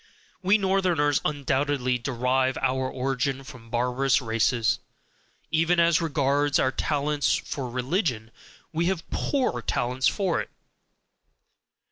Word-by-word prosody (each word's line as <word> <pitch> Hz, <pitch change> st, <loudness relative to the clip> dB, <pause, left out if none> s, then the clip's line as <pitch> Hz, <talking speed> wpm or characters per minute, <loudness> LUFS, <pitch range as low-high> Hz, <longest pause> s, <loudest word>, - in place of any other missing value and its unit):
We 195 Hz, +3 st, +4 dB
Northerners 185 Hz, -7 st, +1 dB
undoubtedly 140 Hz, -3 st, 0 dB
derive 130 Hz, +1 st, 0 dB
our 130 Hz, 0 st, 0 dB
origin 135 Hz, +1 st, -2 dB
from 125 Hz, -3 st, -12 dB
barbarous 125 Hz, +3 st, +1 dB
races, 115 Hz, +1 st, +1 dB, 0.7 s
even 165 Hz, +2 st, +2 dB
as 170 Hz, -1 st, +4 dB
regards 145 Hz, -2 st, +1 dB
our 130 Hz, -, +2 dB
talents 145 Hz, +1 st, 0 dB
for 130 Hz, -3 st, -4 dB
religion 125 Hz, -, -1 dB, 0.4 s
we 165 Hz, +2 st, +1 dB
have 185 Hz, -3 st, -2 dB
POOR 255 Hz, -, 0 dB
talents 125 Hz, +3 st, 0 dB
for 190 Hz, -5 st, +1 dB
it. -, -, -8 dB
135 Hz, 110 wpm, -26 LUFS, 125-160 Hz, 0.7 s, We